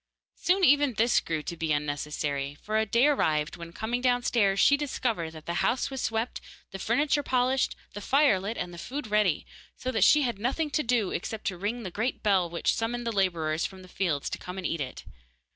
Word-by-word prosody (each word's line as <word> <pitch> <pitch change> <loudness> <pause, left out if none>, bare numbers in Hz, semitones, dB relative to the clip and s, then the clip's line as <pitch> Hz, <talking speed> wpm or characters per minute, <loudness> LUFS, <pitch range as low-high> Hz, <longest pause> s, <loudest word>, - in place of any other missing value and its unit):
Soon 375 +2 +1
even 290 -5 +5
this 230 +3 +3
grew 160 -2 -3
to 170 - -5
be 160 -1 -2
unnecessary, 145 -1 -2
for 215 +1 0
a 220 - 0
day 235 +6 +3
arrived 155 - +1
when, 170 -1 -9
coming 235 +7 -3
downstairs, 240 -5 +2
she 285 - +6
discovered 245 - -2
that 155 -1 -12
the 170 - -2
house 255 +3 +1
was 265 -1 -4
swept, 225 +2 -2 0.3
the 195 - -7
furniture 285 +8 +1
polished, 255 0 +1 0.2
the 205 - -6
fire 275 -3 +4
lit, 205 +5 -4
and 175 0 -4
the 170 - -9
food 280 - -5
ready, 210 -6 +1 0.3
so 255 - -3
that 220 -6 +2
she 300 +7 +6
had 235 -6 -2
nothing 280 +7 -1
to 305 - +1
do 235 -7 +1
except 215 +5 -4
to 190 - -1
ring 210 +6 -3
the 185 - -5
great 225 +8 -2
bell 190 -5 +3
which 170 0 0
summoned 240 +1 -2
the 230 - 0
labourers 170 -6 0
from 190 -1 -13
the - - -13
fields 175 -6 -1
to - - -4
come 180 +1 -7
and 190 - -5
eat 165 -2 -1
it. 130 -2 -6
215 Hz, 215 wpm, -28 LUFS, 170-250 Hz, 0.3 s, she